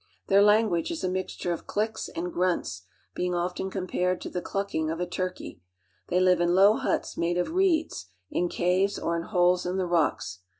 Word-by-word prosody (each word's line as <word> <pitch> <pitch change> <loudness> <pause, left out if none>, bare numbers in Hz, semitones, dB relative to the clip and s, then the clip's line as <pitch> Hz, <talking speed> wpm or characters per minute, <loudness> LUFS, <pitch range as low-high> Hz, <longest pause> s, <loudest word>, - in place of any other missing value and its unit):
Their 195 +1 +6
language 210 -4 +3
is 335 - -4
a - - +1
I - - -3
mixture 185 -1 -3
of 170 - -8
clicks 220 +2 -2
and 175 +1 -5
grunts, 95 - -1 0.3
being 180 0 -1
often 180 +2 -2
compared 185 -1 -1
to - - -6
the 180 - -2
I - - -8
clucking 195 -6 -2
of 165 +1 -3
a 180 - 0
turkey. 185 - -5 0.5
They 180 - +1
live 180 -1 +4
in 175 0 +2
low 200 +3 +6
huts - - -2
made 175 +1 0
of 180 - 0
■ieeds, 330 - +1 0.3
in 175 0 0
caves, 185 +4 +1
or 170 - -1
in 170 - -1
holes 180 -2 +3
in 180 +1 -2
the 185 - 0
rocks. 165 - 0
180 Hz, 205 wpm, -27 LUFS, 175-195 Hz, 0.5 s, Their